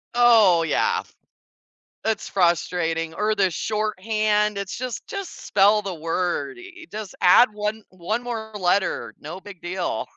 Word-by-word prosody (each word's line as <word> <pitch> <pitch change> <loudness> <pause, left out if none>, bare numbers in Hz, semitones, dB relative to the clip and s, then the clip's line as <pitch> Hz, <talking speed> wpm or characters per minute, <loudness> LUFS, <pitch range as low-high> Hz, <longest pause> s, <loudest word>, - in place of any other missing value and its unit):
Oh, 225 -8 +6
yeah 460 - +1
f - - -22 0.9
it's 220 0 -1
frustrating, 165 -2 0
or 215 +3 0
the 195 -3 +2
shorthand, 210 +1 0
it's 200 -1 -4
just 255 -2 -5
just 395 -3 -7
spell 205 +2 +4
the 195 -2 -4
word 165 -2 -2
i 375 +1 -12
i - - -11
just 215 -2 -6
add 215 +6 +7
1 210 +1 -3
1 185 +6 -3
more 225 -3 -5
letter, 180 - 0
no 155 +6 -8
big 190 -2 -12
deal. 175 -9 -3
205 Hz, 150 wpm, -23 LUFS, 175-220 Hz, 0.9 s, add